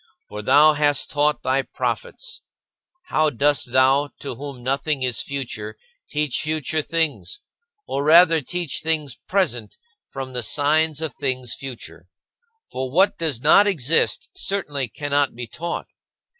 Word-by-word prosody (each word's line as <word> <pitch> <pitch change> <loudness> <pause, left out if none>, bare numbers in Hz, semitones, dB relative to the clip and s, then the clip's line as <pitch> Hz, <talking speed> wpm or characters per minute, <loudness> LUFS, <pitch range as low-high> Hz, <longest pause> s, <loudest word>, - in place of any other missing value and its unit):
For 105 - -6
thou 150 +8 +6
hast 145 -1 +1
taught 145 -2 +1
thy 130 +1 +2
prophets. 485 - -4 0.7
How 155 0 +3
dost 145 -1 +1
thou, 135 +3 +4
to 140 - -4
whom 135 0 -8
nothing 135 +2 -1
is 125 -2 0
future, 120 -6 -5 0.3
teach 150 -3 -1
future 155 0 -1
things 165 - -2 0.5
or 140 - -2
rather 165 +1 +6
teach 175 +3 -3
things 155 -5 -1
present 130 - -1 0.3
from 135 -1 -7
the 125 - -1
signs 150 +5 +2
of 155 -5 -4
things 130 -3 -2
future? 135 -3 -9 0.6
For 130 0 -3
what 185 +9 +3
does 150 -8 -1
not 180 +8 +6
exist 165 -5 +1
certainly 150 -9 -2
cannot 145 +3 -1
be 120 0 -5
taught. 170 +8 -5
145 Hz, 135 wpm, -22 LUFS, 130-160 Hz, 0.7 s, thou